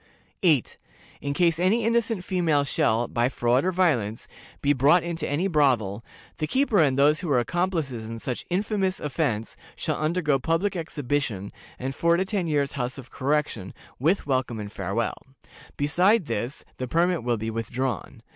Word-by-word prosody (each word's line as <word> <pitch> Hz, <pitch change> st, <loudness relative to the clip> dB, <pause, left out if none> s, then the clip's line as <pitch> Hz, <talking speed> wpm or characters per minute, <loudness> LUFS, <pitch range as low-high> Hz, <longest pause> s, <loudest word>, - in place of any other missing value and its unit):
"8. 155 Hz, -, +2 dB, 0.4 s
In 140 Hz, 0 st, -2 dB
case 170 Hz, 0 st, +2 dB
any 200 Hz, +6 st, +3 dB
innocent 230 Hz, -4 st, +1 dB
female 170 Hz, -6 st, +1 dB
shall, 120 Hz, -3 st, +1 dB
by 120 Hz, +1 st, +1 dB
fraud 125 Hz, +1 st, +2 dB
or 185 Hz, -, +1 dB
violence, 130 Hz, -, +1 dB, 0.3 s
be 145 Hz, 0 st, +3 dB
brought 145 Hz, +6 st, +4 dB
into 170 Hz, -2 st, -3 dB
any 155 Hz, +7 st, +1 dB
brothel, 120 Hz, -, +2 dB, 0.4 s
the 155 Hz, -, -1 dB
keeper 260 Hz, -, +2 dB
and 140 Hz, -5 st, +3 dB
those 150 Hz, +2 st, +4 dB
who 175 Hz, -, -4 dB
are 135 Hz, -4 st, +4 dB
accomplices 155 Hz, -5 st, -1 dB
in 115 Hz, +1 st, -6 dB
such 125 Hz, +2 st, -4 dB
infamous 190 Hz, 0 st, 0 dB
offense 115 Hz, -6 st, -2 dB, 0.2 s
shall -, -, -2 dB
undergo 155 Hz, -3 st, +1 dB
public 165 Hz, +8 st, 0 dB
exhibition, 145 Hz, -, -2 dB, 0.3 s
and 130 Hz, +2 st, -4 dB
four 170 Hz, +4 st, +2 dB
to 190 Hz, -, +1 dB
ten 190 Hz, -3 st, -1 dB
years' 145 Hz, -3 st, +1 dB
House 125 Hz, -1 st, -3 dB
of 130 Hz, -2 st, -11 dB
Correction, 140 Hz, -8 st, -1 dB, 0.2 s
with 165 Hz, +9 st, +2 dB
welcome 130 Hz, -4 st, -1 dB
and 105 Hz, -1 st, -6 dB
farewell. 100 Hz, +4 st, -2 dB, 0.6 s
Besides 180 Hz, +8 st, +3 dB
this, 125 Hz, +5 st, -3 dB
the 130 Hz, -, -3 dB
permit 170 Hz, +4 st, +2 dB
will 120 Hz, -1 st, +1 dB
be 110 Hz, +1 st, -3 dB
withdrawn. 115 Hz, +1 st, -3 dB
145 Hz, 165 wpm, -25 LUFS, 120-175 Hz, 0.6 s, brought